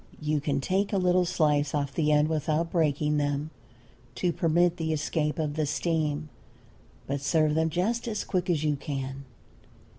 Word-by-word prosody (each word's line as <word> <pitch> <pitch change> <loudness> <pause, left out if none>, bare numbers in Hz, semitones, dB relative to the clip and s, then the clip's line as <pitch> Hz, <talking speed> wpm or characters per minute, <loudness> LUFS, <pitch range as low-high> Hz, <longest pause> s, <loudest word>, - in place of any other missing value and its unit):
You 150 -1 0
can 140 -1 0
take 190 +8 0
a 200 - +1
little 180 -1 +3
slice 150 -4 +1
off 140 -1 -1
the 150 0 +1
end 150 0 +4
without 160 +1 -1
breaking 150 -2 +1
them, 145 +1 -1 0.6
to 175 -2 0
permit 170 +2 +2
the 160 -2 -2
escape 150 0 -1
of 155 -2 -1
the 155 -1 -1
steam. 155 -1 -1 0.8
But 140 0 -3
serve 155 +1 +2
them 160 +1 +2
just 220 +9 -1
as 215 -2 -2
quick 185 -1 -2
as 160 -4 +1
you 150 -2 +1
can. 135 -1 -5
155 Hz, 170 wpm, -27 LUFS, 145-170 Hz, 0.8 s, end